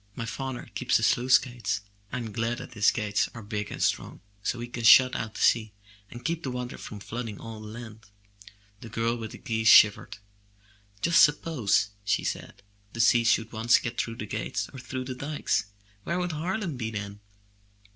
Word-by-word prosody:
My 115 - -4
father 130 +2 -5
keeps 125 0 +2
the 110 - -3
sluice 125 +3 +5
gates. 120 -5 -3 0.3
Fm 115 -4 -4
glad 115 +2 -1 0.2
his 105 -3 +4
gates 105 -2 0
are 115 - -8
big 105 0 -4
and - - -3
strong, - - -1 0.2
so 120 - -2
he 120 - -4
can 120 -1 -7
shut 130 +3 +8
out 110 -1 -4
the - - -5
sea, 110 -2 +3 0.4
and 120 - -11
keep 170 0 -1
the 135 - -4
water 125 -1 -5
from 105 - -8
flooding 115 0 -6
all 110 -1 -8
the 110 - -9
land.*' 110 -1 -10 0.7
The 115 - -10
girl 115 +2 0
with 115 -2 -7
the - - -9
geese 110 -4 -2
shivered. 105 -1 +6 0.9
"Just 170 0 +6
suppose, 145 -9 +2
she 100 - 0
said, 95 - -5 0.3
"the 120 - -8
sea 115 +1 +5
should 115 -1 +2
once 115 +2 +4
get 115 0 -2
through 115 - -5
the 105 - -6
gates - - -3
or 130 - -8
through 130 0 -5
the 130 - -4
dikes! 140 -5 -1 0.4
Where 170 - -2
would 180 -1 -1
Harlem 170 - -3
be 115 -2 -3
then? 100 -2 -6
115 Hz, 190 wpm, -27 LUFS, 110-130 Hz, 0.9 s, shut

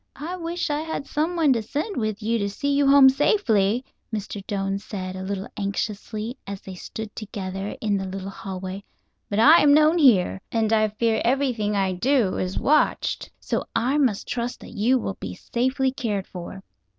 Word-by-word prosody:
"I 320 +6 -5
wish 340 -2 -3
I 295 - 0
had 320 -3 -4
someone 315 -1 +2
to 230 - -1
send 295 - -3
with 215 -2 -2
you 230 +2 +1
to 200 -1 -1
see 280 +8 -1
you 280 0 +3
home 275 -1 +8
safely," 250 - +2 0.3
Mr. 205 -2 -5
Doane 195 -1 -1
said, 185 -2 -6
a 190 - -6
little 195 0 -4
anxiously, 210 +3 -3
as 200 -1 -5
they 190 - -9
stood 215 +4 -7
together 195 -2 -5
in 210 -2 +1
the 190 - -3
little 195 +1 -5
hallway. 190 0 -6 0.5
"But 200 - -2
I 305 +10 +7
am 290 -1 +6
known 310 +3 +5
here, 190 - +4
and 225 -1 +1
I 215 -1 +4
fear 220 +1 0
everything 240 -5 +1
I 195 -1 +1
do 225 +2 +1
is 185 +1 -2
watched. 300 +1 +1
So - - -2
I 265 +5 +2
must 245 -8 +1
trust 240 0 -3
that - - -11
you 240 +4 +3
will 195 -5 -4
be 90 -1 -6
safely 260 - 0
cared 220 -8 -2
for." 185 +2 -9
220 Hz, 185 wpm, -24 LUFS, 195-275 Hz, 0.5 s, home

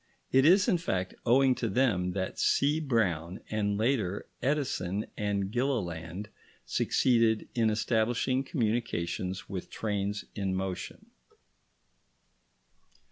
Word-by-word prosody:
It 135 +1 +5
is, 185 +5 +6
in 185 -7 +3
fact, 95 - -2
owing 130 +2 +5
to 115 -2 -2
them 95 -6 +1
that 95 -1 -3
C. 145 +3 +3
Brown, 95 - 0
and 105 -1 0
later 110 -5 0 0.2
Edison 120 -9 -1
and 100 -2 -1
Gilliland, 100 - -2 0.4
succeeded 115 -4 +2
in 115 -2 +2
establishing 115 +4 +1
communications 110 - -2
with 95 -3 -6
trains 105 -1 -2
in 95 -2 -2
motion. 95 -1 -5
110 Hz, 105 wpm, -30 LUFS, 95-130 Hz, 0.4 s, is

